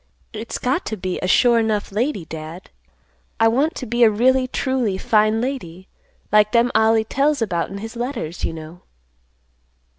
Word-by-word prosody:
"It's 220 +1 -5
got 265 +9 -1
to 220 - -3
be 185 -1 -3
a 185 - -1
sure 235 +4 +4
'nough 215 -3 -1
lady, 215 - -1
Dad. 160 +3 -9 0.7
I 225 - +5
want 280 +9 +1
to 255 - -5
be 240 +1 +1
a 225 - +7
really 255 +4 +2
truly 255 -6 -1
fine 215 +2 +2
lady, 190 -9 -5 0.4
like 210 0 +4
them 240 +1 +3
Ollie 220 0 +3
tells 280 +6 0
about 180 -7 -1
in 195 - -7
his 225 +3 -8
letters, 235 - -4
you - - -1
know." 160 +2 -10
220 Hz, 170 wpm, -21 LUFS, 190-245 Hz, 0.7 s, a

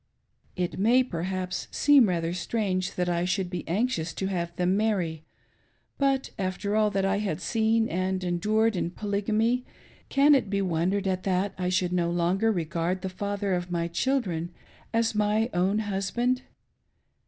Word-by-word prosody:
It 180 0 -2
may, 240 +6 +5
perhaps, 185 -2 -3
seem 280 -7 +5
rather 170 -1 -1
strange 185 0 -1
that 180 -1 0
I 175 -1 0
should 185 0 -1
be 180 -2 -5
anxious 175 -3 -1
to 190 - -2
have 170 -3 -2
them 180 +2 +1
marry; 185 -7 0 0.8
but, 275 -1 +1
after 195 +2 -2
all 215 -1 +3
that 195 -1 0
I 195 +1 +1
had 195 -7 -2
seen 225 0 +1
and 185 0 -1
endured 215 +5 +1
in 175 - -1
Polygamy, 215 +5 0 0.5
can 280 +2 +5
it 265 -7 +2
be 200 0 0
wondered 185 +3 0
at 185 -1 0
that 190 +1 0
I 180 -1 -2
should 180 -1 +1
no 175 -1 +1
longer 180 +6 +1
regard 170 0 -2
the 190 - -2
father 200 +1 -2
of 180 0 -2
my 170 -1 -1
children 175 -3 -1 0.4
as 230 0 +1
my 210 +3 +1
own 185 +4 +2
husband 220 +5 0
190 Hz, 160 wpm, -27 LUFS, 180-220 Hz, 0.8 s, may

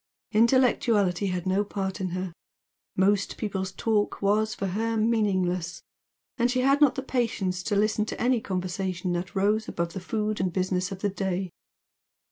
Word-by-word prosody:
Intellectuality 220 -5 +3
had 180 -2 -2
no 190 +2 +2
part 195 -1 -4
in 185 - -1
her; 185 0 -4 0.6
most 195 +1 +2
people's 190 -3 -3
talk 210 +1 0
was 215 +2 +1
for 195 - -3
her 225 +4 -1
meaningless, 185 -6 0 0.6
and 240 +1 +3
she 255 +1 +1
had 275 +3 +3
not 290 -3 +5
the 265 - -3
patience 230 -8 -1
to 205 +3 -1
listen 215 +1 +2
to - - -6
any 245 -1 +2
conversation 185 -1 -2
that 175 +3 -4
rose 210 +3 +2
above 170 -1 -3
the - - -4
food 215 +3 -2
and 185 -1 0
business 185 +1 -1
of 190 -1 -6
the 205 - +1
day. 190 -2 -2
200 Hz, 165 wpm, -27 LUFS, 185-220 Hz, 0.6 s, not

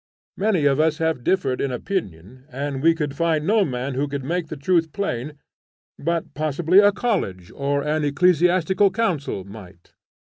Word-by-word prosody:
Many 195 -7 +1
of 140 0 +3
us 155 -1 +2
have 160 -6 -1
differed 135 -8 0
in 140 - -1
opinion, 125 - -5
and 140 +1 -4
we 165 +2 +4
could 150 -4 -3
find 160 -1 0
no 210 +3 +3
man 130 -3 -3
who 140 +3 -1
could 140 -1 -4
make 170 +4 -2
the 155 - -7
truth 165 +2 +1
plain, 150 - -3 0.7
but 170 +2 -2
possibly 155 +5 +2
a 205 0 +6
college, 170 - -2
or 140 0 -1
an 150 +1 0
ecclesiastical 180 +5 +3
council 175 - -2
might. 95 -3 -14
150 Hz, 165 wpm, -22 LUFS, 135-180 Hz, 0.7 s, a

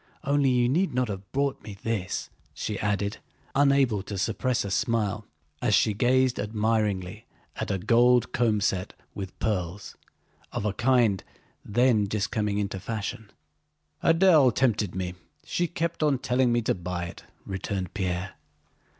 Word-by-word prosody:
Only 140 -1 +2
you 125 -1 +3
need 155 +2 +1
not 125 -2 +1
have 95 -2 -6
bought 140 0 0
me 100 -2 -9
this," 110 -5 -2 0.2
she 105 -2 -3
added, 105 0 -1 0.4
unable 135 -6 +3
to 100 0 -6
suppress 115 +4 0
a 100 - -4
smile 105 -1 0 0.3
as 110 -4 +3
she 110 - +3
gazed 125 +3 +2
admiringly 105 -1 -1 0.3
at - - -3
a 100 - 0
gold 120 +4 +4
comb 110 -3 +2
set 95 -1 -1 0.2
with 95 -2 -7
pearls, 95 -2 -3 0.6
of - - -3
a 105 - 0
kind 120 -6 +2 0.4
then 110 -1 +3
just 100 0 -2
coming 105 -3 0
into 100 -2 -2
fashion. 110 +1 -5 0.7
"Adèle 165 -6 +6
tempted 110 -8 +1
me: 90 -1 -3 0.3
she 175 - 0
kept 170 0 -3
on 150 -3 +3
telling 125 -1 +1
me 120 -1 +1
to - - +2
buy 90 -1 -4
it," 85 - -9 0.2
returned 95 -1 -4
Pierre. 90 -1 -2
110 Hz, 150 wpm, -27 LUFS, 100-125 Hz, 0.7 s, Adèle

